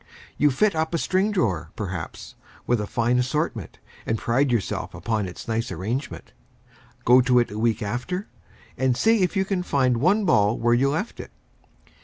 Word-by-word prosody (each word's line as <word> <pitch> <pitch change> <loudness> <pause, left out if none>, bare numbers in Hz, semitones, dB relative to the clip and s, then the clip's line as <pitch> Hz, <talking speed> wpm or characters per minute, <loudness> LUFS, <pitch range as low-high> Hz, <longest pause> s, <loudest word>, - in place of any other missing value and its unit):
You 150 - +3
fit 195 +10 +2
up 160 +1 -1
a - - +2
string 190 +5 +1
drawer, 95 - -1
perhaps, 95 -6 -6 0.3
with 120 -3 +1
a 105 - -4
fine 120 +2 +1
assortment, 125 - -2 0.3
and 110 - -1
pride 125 +5 +1
yourself 115 -5 -2
upon 110 -4 -2
its 90 - -9
nice 115 0 -2
arrangement. 120 +9 -4 0.7
Go 125 +2 +7
to 125 -1 +3
it 120 -4 +2
a 105 - -5
week 115 -1 +1
after, 130 - -3 0.5
and 130 -2 +2
see 225 -1 +3
if 185 +2 0
you 190 - +2
can 190 -2 -1
find 130 -8 +1
one 195 - +2
ball 105 - +3
where 120 +1 +2
you 130 +3 +3
left 160 +11 -3
it! - - -7
125 Hz, 180 wpm, -24 LUFS, 115-165 Hz, 0.7 s, Go